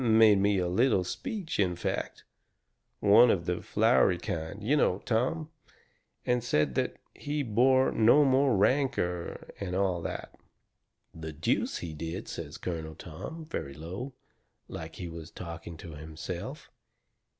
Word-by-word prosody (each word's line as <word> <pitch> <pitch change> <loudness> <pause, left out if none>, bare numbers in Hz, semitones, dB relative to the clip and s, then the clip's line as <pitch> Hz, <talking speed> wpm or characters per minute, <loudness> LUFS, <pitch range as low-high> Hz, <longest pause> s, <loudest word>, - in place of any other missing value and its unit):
Made 110 -3 +6
me 100 0 +3
quite 90 - +1
a - - -1
little 105 +1 +3
speech, 205 - -4
in 90 -3 +2
fact; 90 - -3 0.8
one 105 +4 +7
of 85 -6 +1
the 90 0 -1
flowery 110 -4 +3
kind, 85 +4 -5
you 135 +8 +3
know, 95 -10 +3
Tom, 140 +8 0 0.7
and 125 -1 +1
said 75 - +1
that - - 0 0.2
he 145 0 -3
bore 130 +3 +4
me 110 - -1
no 135 +2 +6
rancour, 105 -6 +1
and 90 -2 -3
all 95 -3 +1
that." - - -5 0.8
"The 80 -1 -6
deuce - - 0
he 80 - -6
did!" 80 +5 -5
says 75 -2 -6
Colonel 80 -3 -5
Tom, 155 - -8
very 70 - -5
low, 95 - -6 0.5
like 80 0 -7
he 90 - -6
was 85 -1 -8
talking 85 -1 -8
to 85 +1 -9
himself. 80 +1 -7
95 Hz, 145 wpm, -29 LUFS, 85-125 Hz, 0.8 s, one